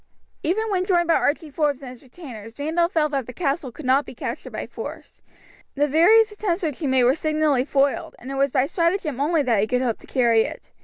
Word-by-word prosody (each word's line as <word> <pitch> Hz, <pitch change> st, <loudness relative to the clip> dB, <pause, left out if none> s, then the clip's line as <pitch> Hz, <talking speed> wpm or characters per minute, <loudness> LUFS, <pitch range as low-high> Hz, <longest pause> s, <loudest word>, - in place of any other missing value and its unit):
Even 430 Hz, +7 st, -1 dB
when 370 Hz, -2 st, +1 dB
joined 350 Hz, -2 st, +2 dB
by 335 Hz, -, +4 dB
Archie 305 Hz, 0 st, 0 dB
Forbes 290 Hz, -2 st, 0 dB
and 255 Hz, -, -7 dB
his 250 Hz, -, -14 dB
retainers 240 Hz, -6 st, -11 dB
Randolph 330 Hz, +5 st, 0 dB
felt 305 Hz, -2 st, +1 dB
that 270 Hz, -4 st, -2 dB
the 250 Hz, -, -8 dB
castle 280 Hz, -4 st, -2 dB
could 290 Hz, +5 st, -10 dB
not 265 Hz, +3 st, +3 dB
be -, -, -11 dB
captured 255 Hz, +1 st, -6 dB
by -, -, -5 dB
force. -, -, -9 dB, 0.5 s
The 290 Hz, +1 st, +2 dB
various 420 Hz, +10 st, +5 dB
attempts 400 Hz, -4 st, -2 dB
which 300 Hz, -5 st, -2 dB
he 305 Hz, -, -2 dB
made 260 Hz, -1 st, +3 dB
were 250 Hz, +2 st, +5 dB
signally 305 Hz, -4 st, +1 dB
foiled, 280 Hz, -1 st, 0 dB
and 260 Hz, -, -9 dB
it -, -, -4 dB
was 275 Hz, +1 st, +2 dB
by 260 Hz, 0 st, +2 dB
stratagem 335 Hz, -3 st, -1 dB
only 310 Hz, +1 st, +2 dB
that 235 Hz, -5 st, +2 dB
he 215 Hz, -, 0 dB
could 250 Hz, +2 st, 0 dB
hope 235 Hz, -3 st, -1 dB
to -, -, -17 dB
carry 235 Hz, -4 st, +3 dB
it. -, -, -6 dB
290 Hz, 235 wpm, -23 LUFS, 255-335 Hz, 0.5 s, various